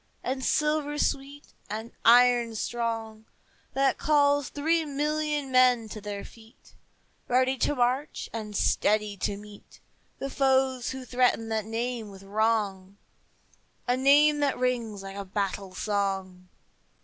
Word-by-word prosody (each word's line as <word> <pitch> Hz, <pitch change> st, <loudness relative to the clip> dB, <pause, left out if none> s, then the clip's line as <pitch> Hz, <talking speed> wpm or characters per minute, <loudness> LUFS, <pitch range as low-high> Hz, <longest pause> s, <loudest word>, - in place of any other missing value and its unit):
And 260 Hz, +1 st, -3 dB
silver 300 Hz, 0 st, 0 dB
sweet, 280 Hz, 0 st, -2 dB, 0.2 s
and 220 Hz, +3 st, -5 dB
iron 240 Hz, -1 st, +5 dB
strong, 225 Hz, -1 st, -3 dB, 0.5 s
That 270 Hz, 0 st, +2 dB
calls 285 Hz, -2 st, +3 dB
three 320 Hz, +3 st, +1 dB
million 295 Hz, -1 st, -2 dB
men 250 Hz, -3 st, +4 dB
to 215 Hz, -, -8 dB
their 205 Hz, -1 st, -6 dB
feet, 225 Hz, +2 st, -18 dB, 0.5 s
Ready 255 Hz, +1 st, +2 dB
to 290 Hz, -, +1 dB
march, 255 Hz, +3 st, -1 dB
and 215 Hz, -2 st, -5 dB
steady 210 Hz, +1 st, +1 dB
to 200 Hz, +1 st, -2 dB
meet 205 Hz, 0 st, -14 dB, 0.4 s
The 275 Hz, 0 st, -5 dB
foes 265 Hz, -2 st, +1 dB
who 260 Hz, -1 st, -6 dB
threaten 245 Hz, -2 st, +1 dB
that 220 Hz, -2 st, -1 dB
name 230 Hz, 0 st, -3 dB
with 195 Hz, -1 st, -13 dB
wrong, 200 Hz, -2 st, -1 dB, 0.9 s
A 245 Hz, -, +3 dB
name 290 Hz, +3 st, +5 dB
that 285 Hz, -2 st, +1 dB
rings 235 Hz, -5 st, -2 dB
like 195 Hz, 0 st, -8 dB
a 200 Hz, -, -4 dB
battle 195 Hz, -1 st, -3 dB
song. 190 Hz, -3 st, -2 dB
240 Hz, 130 wpm, -27 LUFS, 210-275 Hz, 0.9 s, iron